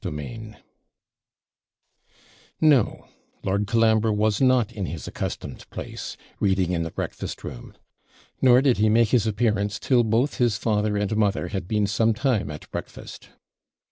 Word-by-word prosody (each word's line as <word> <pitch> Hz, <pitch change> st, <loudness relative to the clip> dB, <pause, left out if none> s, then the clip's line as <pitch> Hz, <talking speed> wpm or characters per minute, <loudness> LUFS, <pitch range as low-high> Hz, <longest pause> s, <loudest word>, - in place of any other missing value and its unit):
CHAPTER 75 Hz, -, -4 dB
XIV 110 Hz, +7 st, -8 dB, 2.0 s
No 145 Hz, -8 st, +3 dB, 0.4 s
Lord 100 Hz, +2 st, 0 dB
Colambre 110 Hz, -1 st, +3 dB
was 105 Hz, +1 st, +1 dB
not 130 Hz, -4 st, +3 dB
in 100 Hz, -5 st, -4 dB
his 85 Hz, -, -6 dB
accustomed -, -, -6 dB
place, -, -, -7 dB, 0.2 s
reading 95 Hz, -3 st, +1 dB
in 85 Hz, -2 st, 0 dB
the 80 Hz, -, -3 dB
breakfast -, -, -5 dB
room: -, -, -9 dB, 0.7 s
nor 125 Hz, 0 st, +6 dB
did 135 Hz, -4 st, +3 dB
he 110 Hz, +1 st, +3 dB
make 115 Hz, 0 st, +4 dB
his 115 Hz, -3 st, +2 dB
appearance 105 Hz, -2 st, 0 dB
till 125 Hz, -3 st, +2 dB
both 115 Hz, +5 st, +1 dB
his 120 Hz, -4 st, +2 dB
father 105 Hz, -2 st, 0 dB
and 105 Hz, +1 st, -1 dB
mother 105 Hz, -2 st, 0 dB
had 95 Hz, -3 st, -4 dB
been 105 Hz, 0 st, +1 dB
some 110 Hz, +3 st, +1 dB
time 120 Hz, -, 0 dB
at 75 Hz, 0 st, -8 dB
breakfast. -, -, -8 dB
110 Hz, 145 wpm, -24 LUFS, 100-115 Hz, 2.0 s, nor